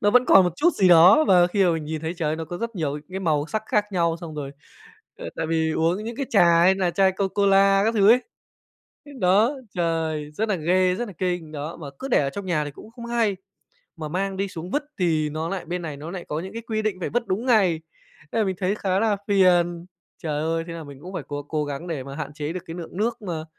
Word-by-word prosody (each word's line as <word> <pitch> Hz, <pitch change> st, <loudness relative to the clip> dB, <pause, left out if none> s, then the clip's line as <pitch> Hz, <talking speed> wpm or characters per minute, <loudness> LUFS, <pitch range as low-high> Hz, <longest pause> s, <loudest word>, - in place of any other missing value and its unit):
nó 205 Hz, -, +3 dB
vẫn 250 Hz, +2 st, +5 dB
còn 195 Hz, -4 st, +7 dB
một 180 Hz, -, 0 dB
chút 345 Hz, +4 st, +4 dB
gì 190 Hz, -, +3 dB
đó 175 Hz, -, +7 dB
và 180 Hz, -2 st, +6 dB
khi 195 Hz, +2 st, +1 dB
mà 175 Hz, -, +4 dB
mình 160 Hz, -2 st, -3 dB
nhìn 155 Hz, 0 st, -4 dB
thấy, 165 Hz, +2 st, -4 dB
trời 160 Hz, -3 st, -2 dB
ơi, 155 Hz, -, -1 dB
nó 165 Hz, -, -4 dB
có 175 Hz, +3 st, -7 dB
rất 230 Hz, 0 st, -4 dB
nhiều 150 Hz, -4 st, -1 dB
ấy 150 Hz, -, -5 dB
cái 190 Hz, +1 st, -4 dB
màu 155 Hz, -4 st, 0 dB
sắc 215 Hz, +5 st, -3 dB
khác 210 Hz, -1 st, +2 dB
nhau. 170 Hz, -2 st, +1 dB
Xong 160 Hz, -3 st, -8 dB
rồi, 140 Hz, -2 st, -5 dB, 0.7 s
ờ, -, -, -7 dB
tại 160 Hz, -, -2 dB
vì 160 Hz, 0 st, 0 dB
uống 170 Hz, +7 st, 0 dB
những 230 Hz, 0 st, -6 dB
cái 275 Hz, -1 st, -3 dB
trà 170 Hz, -7 st, +5 dB
hay 190 Hz, +2 st, +5 dB
là 185 Hz, -2 st, 0 dB
chai 190 Hz, +1 st, +3 dB
Co 195 Hz, 0 st, -1 dB
Cola 195 Hz, 0 st, +4 dB
các 225 Hz, -, +1 dB
thứ 205 Hz, -2 st, +4 dB
ấy, 245 Hz, +3 st, +6 dB, 0.8 s
ưm, 285 Hz, -3 st, -12 dB
đó, 200 Hz, +7 st, +4 dB, 0.2 s
trời, 160 Hz, -3 st, -1 dB
rất 220 Hz, +8 st, -2 dB
là 205 Hz, -, +2 dB
ghê, 180 Hz, +2 st, +2 dB
rất 240 Hz, +2 st, -3 dB
là 200 Hz, -, -9 dB
kinh, 175 Hz, -4 st, -2 dB
đó. 150 Hz, +2 st, -6 dB
Mà 150 Hz, -, -8 dB
cứ 270 Hz, -, -5 dB
để 250 Hz, -, +3 dB
ở 140 Hz, -, 0 dB
trong 200 Hz, +3 st, -7 dB
nhà 155 Hz, -5 st, 0 dB
thì 145 Hz, -, -6 dB
cũng 215 Hz, +9 st, -14 dB
không 235 Hz, 0 st, -10 dB
hay, 235 Hz, -4 st, +1 dB, 0.6 s
mà 155 Hz, -2 st, -6 dB
mang 190 Hz, +4 st, -2 dB
đi 195 Hz, -, -1 dB
xuống 175 Hz, 0 st, -8 dB
vứt 295 Hz, -, 0 dB, 0.2 s
thì 160 Hz, -4 st, +1 dB
nó 155 Hz, +2 st, -3 dB
lại 195 Hz, 0 st, -4 dB
bên 175 Hz, +2 st, -4 dB
này 155 Hz, -4 st, -6 dB
nó 155 Hz, +4 st, -7 dB
lại 180 Hz, -2 st, -6 dB
có 150 Hz, -, -3 dB
những 190 Hz, +3 st, -7 dB
cái 230 Hz, -, -5 dB
quy 220 Hz, -1 st, -2 dB
định 215 Hz, -4 st, -2 dB
phải 180 Hz, -, -3 dB
vứt 240 Hz, +1 st, -1 dB
đúng 210 Hz, +7 st, -2 dB
ngày, 190 Hz, -10 st, +3 dB, 0.5 s
nên 230 Hz, -, 0 dB
là 215 Hz, -, +1 dB
mình 190 Hz, -, -1 dB
thấy 195 Hz, +2 st, 0 dB
khá 190 Hz, -2 st, 0 dB
là 215 Hz, -1 st, +1 dB
phiền. 175 Hz, -4 st, +3 dB, 0.4 s
Trời 150 Hz, -2 st, -2 dB
ơi, 165 Hz, +1 st, -1 dB
thế 170 Hz, -, -6 dB
là 165 Hz, -, -7 dB
mình 140 Hz, -2 st, -11 dB
cũng 185 Hz, +3 st, -9 dB
phải -, -, -4 dB
cố 145 Hz, 0 st, -5 dB
cố 150 Hz, 0 st, -2 dB
gắng 145 Hz, +5 st, -6 dB
để 155 Hz, -6 st, -4 dB
mà 140 Hz, +1 st, -8 dB
hạn 145 Hz, -, -6 dB
chế 150 Hz, +2 st, -4 dB
được 185 Hz, -, -5 dB
cái 165 Hz, -, -7 dB
lượng 175 Hz, 0 st, -8 dB
nước 225 Hz, +3 st, -1 dB
mà, 165 Hz, -6 st, -4 dB
180 Hz, 275 wpm, -24 LUFS, 160-200 Hz, 0.8 s, còn